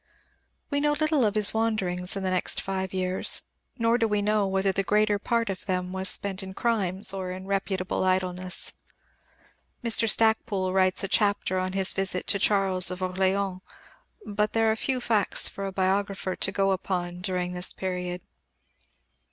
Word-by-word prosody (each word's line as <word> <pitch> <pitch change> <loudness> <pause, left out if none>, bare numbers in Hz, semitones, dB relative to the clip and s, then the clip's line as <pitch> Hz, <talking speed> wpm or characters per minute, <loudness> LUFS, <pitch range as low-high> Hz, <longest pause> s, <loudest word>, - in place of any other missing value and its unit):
We 285 - +1
know 295 +1 +2
little 305 -2 +1
of 210 0 0
his 210 -1 +2
wanderings 195 -5 0
in 195 - -4
the 185 - -1
next 185 - +1
five 190 -1 -3
years, 185 0 +1 0.3
nor 230 0 +2
do 225 - +2
we 210 -1 0
know 210 0 +1
whether 190 0 +1
the 195 - -1
greater 210 +1 +1
part 230 +2 0
of 195 +1 -5
them 180 -1 -2
was 190 +1 +2
spent 200 0 +1
in 190 0 -8
crimes 200 -5 +2
or 190 -1 -4
in 185 +1 -7
reputable 190 -2 -2
idleness. 185 -1 -1 1.1
Mr. 230 -1 +3
Stacpoole 210 -4 +2
writes 185 0 +2
a - - -1
chapter 200 -2 +1
on 185 0 -3
his 195 -1 +1
visit 190 -2 -1
to 200 - +1
Charles 190 -3 +2
of 180 0 -6
Orléans, 190 +1 -1 0.6
but 210 +1 -1
there 225 -1 +3
are - - 0
few 255 +3 -2
facts 220 -4 +3
for 195 0 -6
a - - -4
biographer 190 0 -1
to 190 - +1
go 195 0 +1
upon 180 -2 -3
during 180 -1 -2
this 180 0 +3
period. 180 -1 -4
195 Hz, 170 wpm, -26 LUFS, 185-210 Hz, 1.1 s, Mr